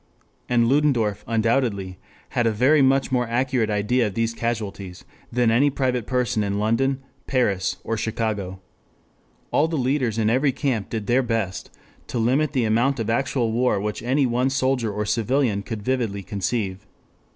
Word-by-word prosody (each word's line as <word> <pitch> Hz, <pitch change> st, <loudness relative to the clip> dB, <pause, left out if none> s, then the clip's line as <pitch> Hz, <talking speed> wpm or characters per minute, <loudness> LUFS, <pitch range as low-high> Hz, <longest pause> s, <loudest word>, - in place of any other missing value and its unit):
] -, -, -37 dB
and 120 Hz, -1 st, +3 dB
Ludendorff 125 Hz, -7 st, +2 dB
undoubtedly 110 Hz, -5 st, 0 dB, 0.3 s
had 120 Hz, -1 st, +1 dB
a -, -, +3 dB
very 130 Hz, +8 st, +4 dB
much 135 Hz, 0 st, +3 dB
more 125 Hz, -2 st, +1 dB
accurate 125 Hz, -1 st, 0 dB
idea 105 Hz, +3 st, +1 dB
of 100 Hz, -, -6 dB
these 115 Hz, 0 st, 0 dB
casualties 105 Hz, -6 st, -4 dB, 0.3 s
than 120 Hz, -1 st, +2 dB
any 135 Hz, +6 st, +4 dB
private 130 Hz, -4 st, -1 dB
person 125 Hz, -4 st, 0 dB
in 100 Hz, 0 st, -1 dB
London, 130 Hz, +6 st, 0 dB, 0.2 s
Paris 105 Hz, -8 st, 0 dB
or 115 Hz, -, -2 dB
Chicago. 105 Hz, -4 st, -3 dB, 0.9 s
All 155 Hz, -, +3 dB
the 165 Hz, -1 st, -2 dB
leaders 130 Hz, -3 st, 0 dB
in 110 Hz, -2 st, +1 dB
every 130 Hz, +5 st, +3 dB
camp 120 Hz, -8 st, -1 dB
did 110 Hz, -3 st, -3 dB
their 120 Hz, +4 st, +3 dB
best 115 Hz, -6 st, -2 dB, 0.4 s
to -, -, -4 dB
limit 130 Hz, +6 st, +1 dB
the 125 Hz, -4 st, +1 dB
amount 120 Hz, +5 st, +2 dB
of 115 Hz, 0 st, -1 dB
actual 120 Hz, -1 st, 0 dB
war 120 Hz, -2 st, +1 dB
which 105 Hz, +1 st, -3 dB
any 130 Hz, +4 st, +1 dB
one 125 Hz, +2 st, +1 dB
soldier 130 Hz, -4 st, 0 dB
or 105 Hz, +1 st, -2 dB
civilian 115 Hz, -1 st, +1 dB
could 105 Hz, 0 st, -6 dB
vividly 115 Hz, -5 st, -1 dB
conceive. 100 Hz, +1 st, -3 dB
115 Hz, 165 wpm, -23 LUFS, 105-130 Hz, 0.9 s, very